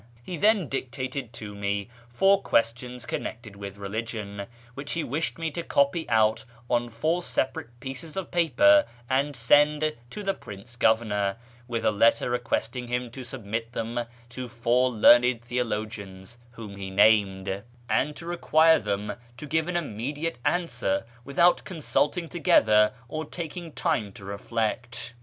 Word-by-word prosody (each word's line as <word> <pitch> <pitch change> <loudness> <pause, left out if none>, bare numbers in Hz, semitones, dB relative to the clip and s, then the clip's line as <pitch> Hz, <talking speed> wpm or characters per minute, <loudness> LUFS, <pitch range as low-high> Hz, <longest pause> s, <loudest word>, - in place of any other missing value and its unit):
He 180 - -5
then 205 0 +3
dictated 130 -1 -4
to 105 -3 -7
me 100 0 -2 0.2
four 195 +11 +4
questions 125 -1 0
connected 110 -4 -5
with 100 0 -8
religion, 100 0 -5 0.3
which 140 +3 -5
he 165 - -1
wished 150 +6 -2
me 165 -1 -2
to 170 - -4
copy 140 0 +1
out 110 -1 +3 0.3
on 120 0 +1
four 155 +10 0
sepa 135 -6 -1
rate 120 +1 -9
pieces 135 +7 -6
of 190 - -4
paper, 295 - +5 0.2
and 135 +3 +1
send 150 +5 +4 0.2
to 210 - -7
the 195 0 +1
Prince 110 - -10
Governor, 110 -4 +2 0.3
with 115 -2 -2
a - - +5
letter 115 +3 +3
requesting 125 0 -1
him 125 0 -2
to 130 +1 -8
submit 115 -1 -5
them 120 +1 -3 0.2
to 125 0 -6
four 120 +2 +2
learned 120 +1 +5
theo 125 +1 0
logians 105 -1 -6 0.2
(whom 105 -4 -9
he 95 -1 -5
named), 100 -1 +3 0.3
and 150 +5 +1
to 165 - -9
require 165 -2 +4
them 105 0 -2 0.2
to 150 - -7
give 160 +2 0
an 180 -1 0
immediate 145 +2 -3
answer, 120 - 0 0.2
without 155 +7 +3
consulting 165 0 -1
together 110 - +4 0.2
or 155 +4 -4
taking 165 +1 -6
time 150 - -1
to 100 - -12
^reflect. 115 +4 -3
120 Hz, 150 wpm, -27 LUFS, 110-155 Hz, 0.3 s, paper